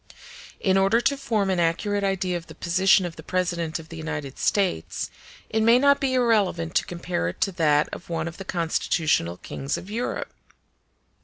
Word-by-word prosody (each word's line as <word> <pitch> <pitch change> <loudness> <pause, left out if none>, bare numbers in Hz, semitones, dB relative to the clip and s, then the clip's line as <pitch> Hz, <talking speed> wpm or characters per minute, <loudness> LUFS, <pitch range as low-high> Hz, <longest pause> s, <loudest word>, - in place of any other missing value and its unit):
In 190 -1 +2
order 195 +4 +4
to 280 +3 +1
form 225 -8 0
an 185 - 0
accurate 200 +5 0
idea 190 -2 0
of 170 -1 -5
the 160 - -11
position 185 +2 +3
of 170 -1 -6
the - - -8
President 175 -3 -1
of 160 -1 -11
the 165 - -8
United 150 -4 -5
States, 190 - 0 0.4
it 220 - 0
may 230 +2 +6
not 280 +2 +4
be 265 -1 0
irrelevant 205 -9 +2
to - - +1
compare 175 - -2
it 90 - -5
to 195 - +2
that 150 -4 +3
of 175 - -8
one 165 -1 -2
of 170 - -7
the 195 - -6
constitutional 160 - 0
kings 135 +8 -4
of 195 - -9
Europe. 235 +3 -3
180 Hz, 185 wpm, -25 LUFS, 165-205 Hz, 0.4 s, may